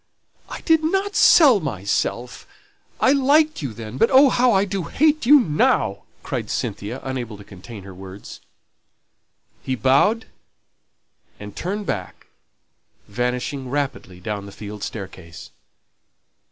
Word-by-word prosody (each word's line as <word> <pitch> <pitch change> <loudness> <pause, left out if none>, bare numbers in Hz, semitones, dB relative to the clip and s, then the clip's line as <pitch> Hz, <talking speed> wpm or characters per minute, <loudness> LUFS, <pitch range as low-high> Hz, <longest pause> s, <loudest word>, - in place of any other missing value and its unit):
"I - - -7
did 320 -1 +2
not 390 +5 -1
sell 275 -10 +6
myself; 120 - -3 0.5
I 260 - +4
liked 290 - +3
you 140 -5 -4
then. 110 +2 -8
But 225 - +4
oh, 270 +1 +6
how 250 0 +3
I 195 -1 +3
do 195 -3 -4
hate 305 -3 +1
you 295 +2 +8
now!" 155 - +1 0.2
cried - - -4
Cynthia, 110 +6 -4
unable 125 -5 -5
to 100 - -12
contain 100 +2 -11
her 95 0 -11
words. 95 +2 -11 1.2
He 130 - -2
bowed 140 - +2 1.1
and 105 -1 -10
turned 200 +4 -4
back, 95 - -5 0.8
vanishing 125 +4 -3
rapidly 135 -10 -4
down 100 +2 -5
the - - -10
field 105 +1 -9
staircase. 95 -5 -8
130 Hz, 125 wpm, -21 LUFS, -, 1.2 s, you